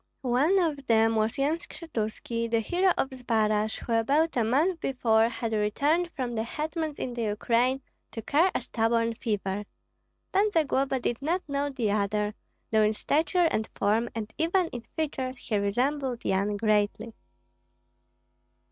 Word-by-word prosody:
One 270 +10 +3
of 300 -7 0
them 225 0 +4
was 220 0 0
Yan 295 +4 +1
Skshetuski, 230 -7 -4
the 230 0 +2
hero 360 - +2
of 270 - 0
Zbaraj, 220 -4 0
who 235 - -3
about 285 +9 +2
a 240 - +2
month 310 +10 +2
before 230 -5 +2
had 230 -1 -3
returned 285 +12 +1
from 250 -3 -3
the 220 - -1
hetmans 310 +5 -3
in 250 - -4
the 240 - -4
Ukraine 235 +5 +1 0.3
to 225 - -6
cure 320 - +3
a - - 0
stubborn 230 0 0
fever; 205 -3 -2 0.7
Pan 405 +2 +4
Zagloba 275 -4 +1
did 240 +1 -2
not 340 +5 -1
know 280 0 -1
the 245 -7 -1
other, 210 0 0 0.4
though 220 -1 +4
in 215 0 +2
stature 325 +8 +2
and 215 - -1
form 225 +3 +1
and 220 -1 -5
even 340 +2 +2
in 240 - -6
features 270 -5 -2
he 230 - -3
resembled 250 +5 -1
Yan 200 +2 +1
greatly. 215 +1 +1
240 Hz, 155 wpm, -27 LUFS, 220-290 Hz, 0.7 s, them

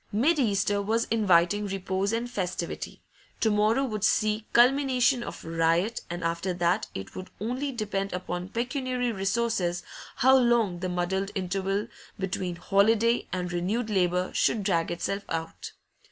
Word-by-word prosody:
Mid 290 +10 +2
Easter 205 -4 +1
was 225 +3 0
inviting 205 -1 +3
repose 195 +1 -1
and 230 +1 -1
festivity; 180 -6 -4 0.4
to 220 - +2
morrow 215 +5 +3
would 215 -5 -4
see 215 0 +1
culmination 255 0 +4
of 235 - -7
riot, 165 +6 +1
and 175 0 -5
after 170 +2 -1
that 175 0 +1
it 95 0 -7
would 185 - -7
only 250 +7 -2
depend 205 -5 -3
upon 180 0 -4
pecuniary 250 +1 -1
resources 195 -3 -1 0.3
how 260 +2 +5
long 235 -8 +3
the 185 +1 -3
muddled 185 +2 -1
interval 195 +2 -1 0.3
between 185 -2 -3
holiday 220 +6 +2
and 180 -1 -3
renewed 215 +6 -1
labour 180 -2 +1
should 215 - +1
drag 170 -4 +1
itself 195 +3 -2
out. 165 0 -5
200 Hz, 140 wpm, -27 LUFS, 180-230 Hz, 0.4 s, how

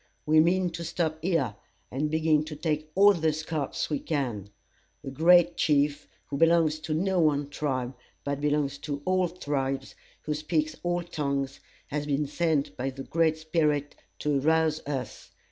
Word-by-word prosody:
We 155 +1 +5
mean 175 +2 +3
to 170 - -6
stop 160 -1 -2
here, 160 - 0 0.4
and 145 +4 -1
begin 155 -1 +2
to 155 -1 -7
take 155 0 -2
all 200 +2 +7
the 160 -3 +1
scalps 155 -2 -3
we 150 -3 -1
can. 125 - -3 0.5
A 135 - -5
great 170 +4 +5
chief, 145 -1 +2 0.2
who 140 - -4
belongs 165 -1 +4
to 155 0 -3
no 190 +3 +1
one 145 -3 +2
tribe, 130 -4 -2 0.3
but 140 0 -3
belongs 145 -1 0
to 145 -1 -5
all 185 -1 +2
tribes, 135 -5 -3 0.3
who 150 - -1
speaks 155 0 -1
all 175 0 -1
tongues, 140 -5 -2 0.3
has 150 0 -3
been 145 +1 +1
sent 155 -1 0
by 130 +2 -2
the 135 0 -7
Great 160 0 +1
Spirit 150 -2 0 0.2
to 145 -2 0
arouse 160 +1 +2
us. 135 -3 -5
155 Hz, 160 wpm, -27 LUFS, 140-165 Hz, 0.5 s, all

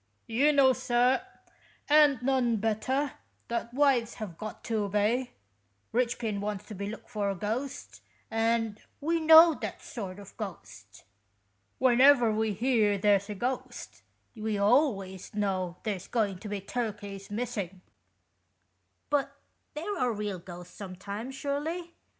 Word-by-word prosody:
" - - -46
You 265 +5 +3
know, 275 -3 +5
sir, 250 +4 +2 0.7
and 290 -4 +5
none 255 -3 +2
better, 225 +6 0 0.4
that 235 0 -2
wives 255 -4 +2
have 210 -7 -6
got 215 +5 -8
to 220 -3 -1
obey. 210 +5 0 0.6
Eichpin 235 -3 0
wants 205 -1 -4
to - - -6
be 200 +1 -4
took 220 - -9
for 210 -4 -2
a 195 - -2
ghost, 205 - -4 0.3
and 225 -1 0 0.2
we 330 +3 0
know 320 +1 +9
that - - -6
sort 195 -5 -6
of 200 -1 -12
ghost. 100 - -9 0.7
When 255 -1 +4
ever 265 -5 +7
we 215 0 0
hear 215 -2 +2
there's 200 0 +2
a 210 - -4
ghost, 250 +6 -4 0.3
we 215 -1 -2
always 200 - +1
know 185 -4 -1
there's 200 -4 -3
going 205 -6 0
to 210 - -8
be 205 -1 -3
turkeys 205 -3 -5
missing." 205 -5 -4 0.6
" - - -47
But 290 -2 +1 0.4
there 360 +5 -3
are 250 - +2
real 205 -3 -3
ghosts 175 0 -11
sometimes, 200 +6 -7
surely 315 +5 -3
220 Hz, 140 wpm, -29 LUFS, 200-260 Hz, 0.7 s, know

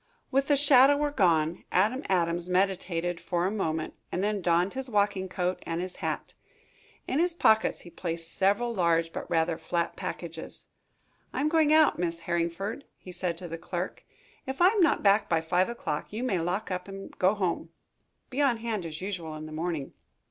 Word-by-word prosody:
With 275 +1 +2
the 290 - +4
shadower 285 +1 +5
gone, 170 - +2
Adam 220 +8 +2
Adams 175 -1 +1
meditated 180 -2 0
for 175 0 -1
a 190 - +1
moment 160 -7 -2 0.2
and 180 - -1
then 205 -1 0
donned 175 +2 +2
his 265 -1 -4
walking 200 -3 +1
coat 180 0 -2
and 165 0 -3
his 180 +1 -5
hat. - - -3 0.7
In 270 - 0
his 345 0 +2
pockets 220 -9 +3
he 175 - -12
placed 165 -1 -5
several 205 +5 +2
large 165 -4 +1
but - - -6
rather 165 0 +1
flat 170 +1 -1
packages. 165 -2 -6 0.7
"I - - -3
am 300 - +2
going 315 -2 +3
out, 310 - +5
Miss 170 -1 -2
Harringford," 170 +10 -2
he 185 - -11
said 175 -2 -3
to 175 - -7
the 165 0 -6
clerk. 175 +2 -4 0.4
"If 265 0 -4
I 355 +1 +7
am 420 -1 +1
not 335 - +3
back 200 +1 +4
by 165 - +3
five 180 +4 +1
o'clock, 160 -11 -4
you 220 +4 -4
may 200 -8 +1
lock 180 +5 -2
up 180 0 -3
and 195 0 -9
go 190 +3 +4
home. 180 -4 -1 0.6
Be 270 +3 -1
on 265 -5 +3
hand 220 -6 -3
as 155 +1 -7
usual 175 -5 -4
in 155 0 -7
the 155 - -9
morning." 160 -2 -3
185 Hz, 190 wpm, -28 LUFS, 170-220 Hz, 0.7 s, I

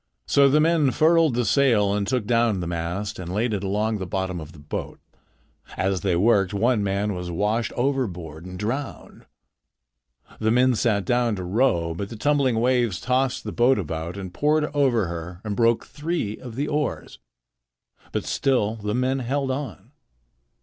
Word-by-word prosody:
So 140 -1 +5
the 150 +3 +4
men 160 -2 +3
furled 160 -1 +3
the 120 -1 +1
sail 110 -6 +3
and 100 -1 -1
took 125 -5 0
down 115 -3 +2
the 90 - -3
mast 85 +5 -3
and 90 -1 -6
laid 110 +4 0
it 100 -1 -2
along 105 +2 -1
the 95 - -4
bottom 95 -1 -2
of 80 0 -10
the - - -15
boat. 75 0 -6 0.8
As 95 -2 0
they 95 -3 +1
worked, 100 0 +3
one 115 +1 +2
man 100 +1 -1
was 90 -1 -5
washed 105 +7 0
overboard 95 - -2
and 90 0 -8
drowned. 120 +8 -5 1.1
The 110 - +1
men 125 +2 +4
sat 105 -3 +1
down 120 -2 +1
to 95 - -5
row, 90 -4 +1
but 100 +4 -5
the 115 - -7
tumbling 135 -1 +1
waves 120 -5 +1
tossed 130 +1 0
the - - -5
boat 130 +2 +3
about 85 0 -4
and 95 -2 -7
poured 150 +4 +2
over 130 -7 +3
her 85 +1 -6
and 105 -2 -3
broke 115 0 +2
three 150 -9 -3
of 120 -3 -10
the 145 +3 -1
oars. 150 0 -3 0.9
But - - -2
still 115 -5 0
the 105 0 -3
men 130 +2 0
held 135 +2 -1
on. 130 -5 -6
110 Hz, 175 wpm, -24 LUFS, 95-130 Hz, 1.1 s, So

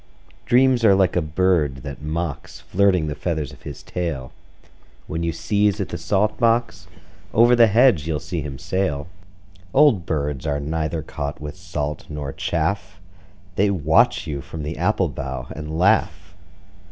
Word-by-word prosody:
Dreams 125 -1 +4
are 100 -3 +6
like 95 -2 +2
a 90 - +3
bird 75 -4 +1
that 70 -1 -7
mocks, 80 -1 -4
Flirting 95 -4 +2
the 75 - -3
feathers 80 -3 -3
of - - -16
his - - -9
tail. 75 -8 -4 0.7
When 80 +2 -4
you 85 0 0
sieze 105 +4 +1
at 95 - -2
the 85 - -4
salt 100 +6 0
box, 115 -6 +1 0.5
Over 120 +2 +6
the 120 -1 +6
hedge 110 - +4
you'll 80 -2 -1
see 85 +1 -4
him 70 -2 -6
sail. 75 -3 -2 0.7
Old 135 - +5
birds 75 -2 -2
are 70 -1 0
neither 80 +2 -2
caught 75 -1 -5
with 75 +1 -7
salt 80 -4 -5
nor 75 -2 -5
chaff: 90 +2 -2 0.6
They 100 +1 +3
watch 80 -4 +3
you 70 -3 -4
from 80 +3 -7
the 75 +3 -4
apple 90 +3 +1
bough 65 -3 -5
and 75 +1 -5
laugh. 100 +4 +1
85 Hz, 160 wpm, -22 LUFS, 75-100 Hz, 0.7 s, are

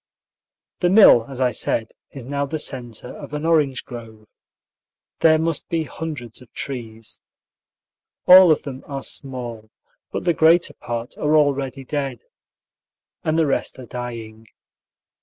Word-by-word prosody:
The 175 - +2
mill, 185 - +7
as 135 -2 -7
I 125 -1 +2
said, 115 -1 -2 0.2
is 135 -4 -10
now 140 +1 -2
the 155 - -3
centre 125 -5 -4
of 145 0 -8
an 150 +2 -4
orange 150 -6 +1
grove. 110 -3 -11 0.9
There 160 -1 +5
must 160 -2 -2
be 165 -1 0
hundreds 150 -8 -7
of 125 - -17
trees. 115 -4 -7 1.0
All 185 -1 +9
of 155 - +1
them 135 -2 -8
are 135 -2 -5
small, 120 -5 -4 0.4
but - - -4
the 175 - +2
greater 160 0 +4
part 120 -1 -6
are 150 +1 +2
already 140 -2 0
dead, 135 -4 -4 1.0
and 155 0 0
the 165 - +3
rest 140 - -1
are 130 - -9
dying. 115 -2 -7
135 Hz, 140 wpm, -21 LUFS, 120-155 Hz, 1.0 s, All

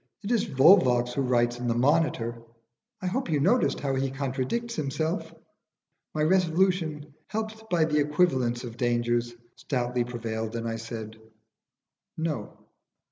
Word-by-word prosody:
It 200 - -3
is 235 - +2
Volvox 130 -5 +5
who 140 - 0
writes 120 -2 +1
in 125 - -3
the 115 - +1
'Monitor,' 120 -4 +1 0.6
I - - -2
hope 215 +5 -1
you 150 -2 +1
noticed 210 - +2
how 135 -1 -1
he 135 0 0
contradicts 135 - -2
himself?" 155 +5 -2 0.8
My 155 - +1
resolution, 165 -3 +1
helped 220 0 -5
by 170 -3 +3
the 150 -1 +1
equivalence 145 -6 +1
of 120 -1 -8
dangers, 120 -1 0 0.2
stoutly 125 -3 -1
prevailed, 115 -2 -4
and 115 0 -3
I 115 0 -2
said, 110 -1 -7 1.0
"No." 155 -10 -3
135 Hz, 135 wpm, -27 LUFS, 120-165 Hz, 1.0 s, Volvox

